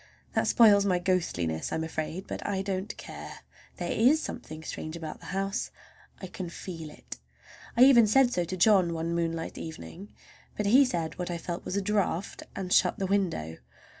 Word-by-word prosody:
That - - +1
spoils 210 -4 +6
my 185 -3 +2
ghostliness, 165 - -1
I - - -1
am 160 - -1
afraid; 160 +3 -4
but - - -6
I 195 -1 -1
don't 195 0 -3
care—there - - -9
is 265 +8 +4
something 160 - -7
strange 155 0 -6
about 160 -2 -7
the - - -12
house—I 195 0 -5
can 180 -1 -6
feel 165 -2 -7
it. 150 - -11 0.6
I 245 - +8
even 245 -4 +7
said 250 +3 +4
so 175 - +1
to 185 +2 -5
John 185 -3 +4
one 165 +1 -2
moonlight 165 -1 -2
evening, 165 +4 -8 0.5
but 210 - -1
he 255 +7 +6
said 170 -8 -3
what 180 - -3
I 175 - -2
felt 170 +1 -5
was 195 - -2
a 200 - 0
draught, 200 -3 -1
and 185 -2 -2
shut - - +4
the 195 - -1
window. 175 - -1
185 Hz, 180 wpm, -28 LUFS, 165-200 Hz, 0.6 s, I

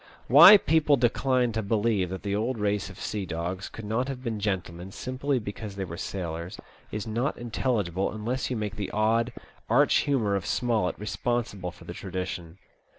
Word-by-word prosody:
Why 170 - +10
people 150 -4 +3
decline 125 0 +2
to 110 0 -1
believe 105 -3 +1
that 95 +1 -6
the 100 -1 -1
old 115 +4 -1
race 105 -3 -1
of - - -12
sea 105 -2 -3
dogs 90 +2 -4
could 110 - -9
not 115 +5 -1
have 130 -2 -5
been 115 -4 -3
gentlemen, 95 -3 -3
simply 130 +5 -2
because 105 -2 -6
they 100 -1 -3
were 85 - -7
sailors, 85 0 -5 0.3
is 105 -1 -4
not 115 +6 -1
intelligible 105 -6 -1
unless 115 +5 -3
you 125 - -1
make 105 -4 -4
the 100 - -3
odd, 115 +3 +1 0.4
arch 140 +6 +4
humour 120 -9 +1
of 95 - -3
Smollett 115 -7 0
responsible 105 -1 -2
for - - -14
the - - -6
tradition. 90 -2 -5
110 Hz, 175 wpm, -27 LUFS, 95-120 Hz, 0.4 s, Why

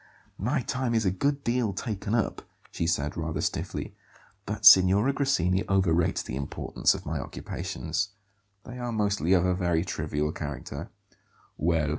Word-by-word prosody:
"My 125 +6 0
time 125 -1 -1
is 110 -2 +2
a 95 - +3
good 140 +9 -1
deal 120 -3 0
taken 105 +1 -3
up," 115 - -1 0.3
she 85 - -2
said 75 -3 0
rather 80 -1 -3
stiffly; - - -3 0.5
"but - - -3
Signora 95 +8 +8
Grassini 95 - +1
overrates 85 -4 +2
the - - -6
importance 70 +1 0
of - - -8
my - - -2
occupations. 90 +3 -4 0.5
They 125 0 -9
are 120 -1 -3
mostly 100 -5 +1
of 90 -1 +4
a 90 - +2
very 90 -2 0
trivial 75 -3 -2
character." 70 -4 -6
95 Hz, 145 wpm, -27 LUFS, 85-115 Hz, 0.5 s, Signora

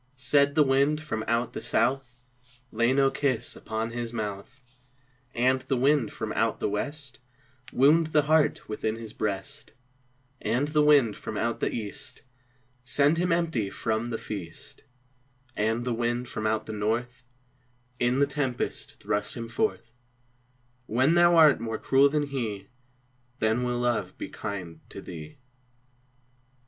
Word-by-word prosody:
Said 140 +3 +3
the 155 - +6
wind 140 +2 +2
from 130 -8 -4
out 115 +1 0
the - - -5
south, 125 0 0 0.6
"Lay 115 +2 +2
no 135 0 +3
kiss 130 -4 -1
upon 110 +1 -4
his 120 -1 -4
mouth," 105 +3 -5 0.8
And 130 +2 +2
the 130 0 -1
wind 140 +3 +2
from - - -4
out - - 0
the - - 0
west, 140 +6 -4 0.5
"Wound 155 +5 +4
the 155 -1 +3
heart 155 +1 +2
within 110 0 -2
his 115 -1 -8
breast," 105 +8 -4 0.7
And 125 +7 0
the 150 0 +3
wind 145 -8 +5
from 110 - -6
out 115 +1 -1
the - - 0
east, 105 +4 -5 0.6
"Send 145 +6 +3
him 180 0 +1
empty 165 - 0
from 110 +3 -2
the 115 - -2
feast," 90 -8 -7 0.7
And 115 +3 0
the 125 - 0
wind 120 +1 -1
from 110 -2 -3
out 110 0 0
the 110 - -6
north, 115 +4 -2 0.8
"In 120 +1 +2
the 140 - +4
tempest 140 -3 -3
thrust 105 0 -2
him 115 -1 -5
forth; 120 - -2 0.9
When 130 +8 +3
thou 175 0 +5
art 155 -4 +7
more 115 -1 -3
cruel 135 +4 +4
than 150 +1 0
he, 110 -8 -4 0.7
Then 110 +2 +1
will 125 0 -1
Love 120 -6 -1
be - - -6
kind 90 -6 -6
to - - -8
thee." 85 - -9
120 Hz, 150 wpm, -27 LUFS, 110-140 Hz, 0.9 s, art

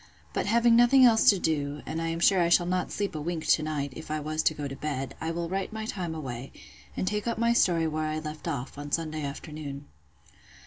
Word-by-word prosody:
But - - -1
having 235 +2 +4
nothing 240 +2 +7
else 225 -2 +6
to 200 - +5
do, 145 -4 -2
and 160 +1 -3
I 165 - -1
am 165 0 -2
sure 185 +1 +4
I 170 - +2
shall 175 0 +4
not 180 +1 -1
sleep 200 -2 -2
a 155 - -4
wink 165 0 -3
to - - +4
night, 145 -3 -3
if 160 - -9
I 155 0 -1
was 155 +1 -2
to 155 - +2
go 145 -1 -4
to 135 - -6
bed, 135 -2 -4
I 160 - -2
will 170 0 -2
write 190 +2 -3
my 220 0 -5
time 175 -7 -4
away, 130 -4 -6 0.5
and - - -1
take 210 +2 -1
up 235 - -1
my 235 +1 +3
story 170 -7 +3
where 155 0 -2
I 155 0 -2
left 155 +1 -6
off, 140 -3 -4
on 145 0 -7
Sunday 155 -1 -1
afternoon. 145 0 -6
160 Hz, 240 wpm, -28 LUFS, 150-185 Hz, 0.5 s, nothing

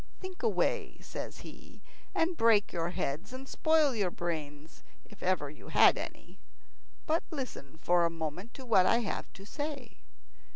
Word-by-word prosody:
"Think 375 -1 -8
away," 450 - +1
says - - -7
he, - - -12 0.4
"and 335 +2 +2
break 225 -6 +4
your 170 -1 -1
heads, 170 - -3
and 265 +1 -7
spoil 315 -3 +3
your 205 -5 +1
brains, 155 -3 -5 0.2
if 210 - -16
ever 180 -5 +1
you 150 +2 -12
had - - +6
any; - - -8 0.7
but 320 +2 +2
listen 255 - -6
for 175 0 +4
a 170 - +3
moment 165 +6 -5
to 265 - -9
what 190 -6 +5
I 235 - +4
have 210 - -4
to 195 - -12
say." 285 0 -5
205 Hz, 160 wpm, -31 LUFS, 170-270 Hz, 0.7 s, had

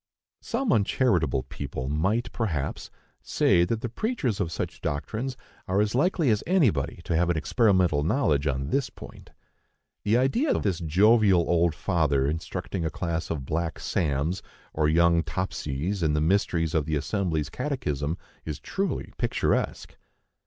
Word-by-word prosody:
Some 245 +1 0
uncharitable 100 - +2
people 65 +1 -6
might, 100 - 0
perhaps, 85 - -3 0.3
say 85 - +3
that 110 +4 -2
the 125 - -2
preachers 130 - -2
of 85 -5 -1
such 85 0 -4
doctrines 110 - -3 0.3
are 95 +2 +1
as 105 0 +1
likely 155 0 +2
as 105 - +1
anybody 130 - +2
to - - -1
have 85 +1 +2
an 85 - +1
experimental 90 - +2
knowledge 75 - +1
on 70 +1 -2
this 135 -2 +1
point. - - -12 0.7
The 105 +3 +3
idea 185 - +2
of - - -1
this 95 -5 0
jovial 95 +2 +4
old 85 -2 +2
father 75 -7 +1
instructing 85 +4 -3
a 80 - 0
class 85 0 -3
of 70 -5 -3
black 85 +4 -2
"Sams" 80 +2 -1 0.3
and 75 -1 +2
young 85 +1 +4
"Topsys" 85 +1 -3
in 80 -2 +2
the - - +2
mysteries 80 -1 +1
of 80 -2 +1
the 80 - 0
Assembly's 80 -2 -1
Catechism 80 - -2 0.3
is 75 -3 -4
truly 195 0 -3
picturesque! - - -1
85 Hz, 150 wpm, -26 LUFS, 75-110 Hz, 0.7 s, jovial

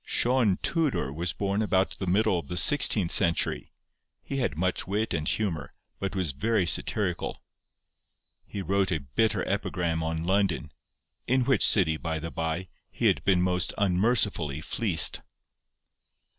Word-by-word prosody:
Sion 120 -6 +2
Tudor 150 - 0
was 85 +4 -1
born 100 +1 -2
about 95 -3 +1
the 95 - -4
middle 100 0 +2
of - - -10
the 90 - -5
sixteenth 105 - +4
century. 85 -4 +2 0.6
He 140 - -5
had 120 - -1
much 90 +1 -1
wit 105 +3 -1
and 75 -2 -2
humour, 90 -9 -2 0.3
but 95 0 -4
was 90 -6 -1
very 100 +7 0
satirical. 85 - -1 1.1
He 100 - -6
wrote 95 +1 0
a 80 -4 -1
bitter 110 -1 +1
epigram 85 -2 -2
on 80 0 -3
London, 95 -5 0 0.6
in 130 0 +2
which 135 -1 +3
city, 80 -7 +4
by 80 0 -3
the 80 +1 -6
bye, 80 +3 -3 0.2
he - - -4
had - - +2
been 90 -2 +3
most 90 0 0
unmercifully 95 - +1
fleeced. 90 +1 0
95 Hz, 145 wpm, -27 LUFS, 80-105 Hz, 1.1 s, sixteenth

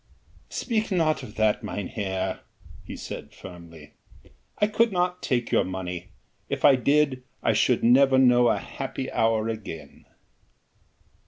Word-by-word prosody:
"Speak 220 -3 -2
not 165 -4 +1
of 105 - -10
that, 110 -1 +1
mynheer," 95 -1 -3 0.4
he - - -8
said - - -8
firmly, 85 -4 -12 0.6
"I - - +3
could 220 +2 +2
not 180 0 -1
take 120 -3 -1
your - - +3
money. 90 -1 -5 0.4
If - - -1
I 140 - +8
did 140 0 +2 0.2
I 115 - +3
should 115 +3 +2
never 130 +3 +5
know 125 -2 +5
a - - +2
happy 135 -1 -6
hour 110 -1 +1
again." 110 -8 -7
120 Hz, 135 wpm, -25 LUFS, 100-140 Hz, 0.6 s, I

